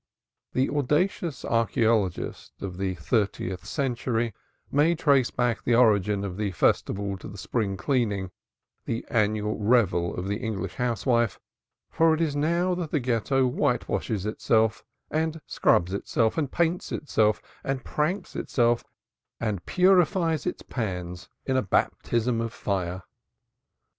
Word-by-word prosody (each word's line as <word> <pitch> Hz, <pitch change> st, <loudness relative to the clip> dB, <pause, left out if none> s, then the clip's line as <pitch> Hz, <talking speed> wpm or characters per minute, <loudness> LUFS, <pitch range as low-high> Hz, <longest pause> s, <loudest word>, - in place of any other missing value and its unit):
The 130 Hz, +1 st, +2 dB
audacious 150 Hz, +1 st, 0 dB
archaeologist 110 Hz, -4 st, 0 dB
of 95 Hz, -2 st, -5 dB
the 95 Hz, -1 st, -1 dB
thirtieth 95 Hz, 0 st, -1 dB
century 120 Hz, -4 st, -1 dB, 0.4 s
may 155 Hz, +4 st, +3 dB
trace 140 Hz, -6 st, +3 dB
back 120 Hz, -2 st, -1 dB
the 120 Hz, -, +3 dB
origin 105 Hz, -4 st, +3 dB
of 95 Hz, -2 st, -4 dB
the 105 Hz, -1 st, -1 dB
festival 100 Hz, +2 st, +1 dB
to -, -, -9 dB
the 100 Hz, -, -9 dB
Spring 100 Hz, -1 st, -2 dB
Cleaning, 100 Hz, -3 st, 0 dB, 0.5 s
the 115 Hz, -, -3 dB
annual 105 Hz, -1 st, +1 dB
revel 105 Hz, -6 st, +2 dB
of 90 Hz, +2 st, -3 dB
the 100 Hz, +1 st, -1 dB
English 100 Hz, -5 st, -4 dB
housewife, 120 Hz, -2 st, 0 dB, 0.5 s
for 165 Hz, -1 st, +4 dB
it -, -, -5 dB
is 155 Hz, -4 st, 0 dB
now 170 Hz, +5 st, +1 dB
that 175 Hz, -3 st, -3 dB
the 150 Hz, -, +1 dB
Ghetto 130 Hz, +2 st, +1 dB
whitewashes 110 Hz, -4 st, -1 dB
itself 110 Hz, 0 st, +1 dB, 0.3 s
and 160 Hz, +1 st, -1 dB
scrubs 90 Hz, +2 st, +2 dB
itself 110 Hz, +3 st, 0 dB
and 150 Hz, -5 st, -1 dB
paints 170 Hz, +1 st, 0 dB
itself 110 Hz, -7 st, +1 dB, 0.2 s
and 135 Hz, -1 st, -2 dB
pranks 170 Hz, +7 st, -2 dB
itself 120 Hz, -2 st, +1 dB, 0.6 s
and 105 Hz, -6 st, -3 dB
purifies 180 Hz, -3 st, +3 dB
its -, -, -3 dB
pans 90 Hz, -6 st, -4 dB, 0.2 s
in 130 Hz, -, 0 dB
a 130 Hz, -, +3 dB
baptism 115 Hz, +2 st, 0 dB
of 115 Hz, -1 st, -3 dB
fire. 95 Hz, -3 st, -3 dB
115 Hz, 135 wpm, -26 LUFS, 100-140 Hz, 0.6 s, for